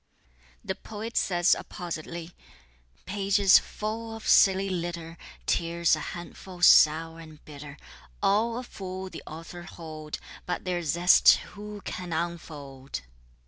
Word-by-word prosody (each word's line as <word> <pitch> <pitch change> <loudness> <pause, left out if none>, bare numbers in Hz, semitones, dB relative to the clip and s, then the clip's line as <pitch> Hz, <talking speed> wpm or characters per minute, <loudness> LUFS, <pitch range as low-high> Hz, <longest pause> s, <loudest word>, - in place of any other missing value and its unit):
The - - -2
poet 220 +2 -8
says 175 -1 +3
appositely: 170 0 -6 0.7
Pages 200 0 +4
full 225 +1 -5
of 225 - -8
silly 195 -1 +5
litter, 170 -2 -4 0.3
Tears 170 0 +2
a - - -6
handful 175 +2 -8
sour 165 0 +6
and 155 -2 -13
bitter; 145 -1 -10 0.4
All 225 +4 +2
a 250 - -4
fool 190 -4 -7
the - - -8
author 165 +3 -9
hold, 155 -3 -8 0.3
But 180 - -3
their 180 -1 -1
zest 170 +3 +6 0.2
who 210 0 -8
can 180 -2 -6
unfold? 145 - -5
175 Hz, 120 wpm, -27 LUFS, 160-195 Hz, 0.7 s, sour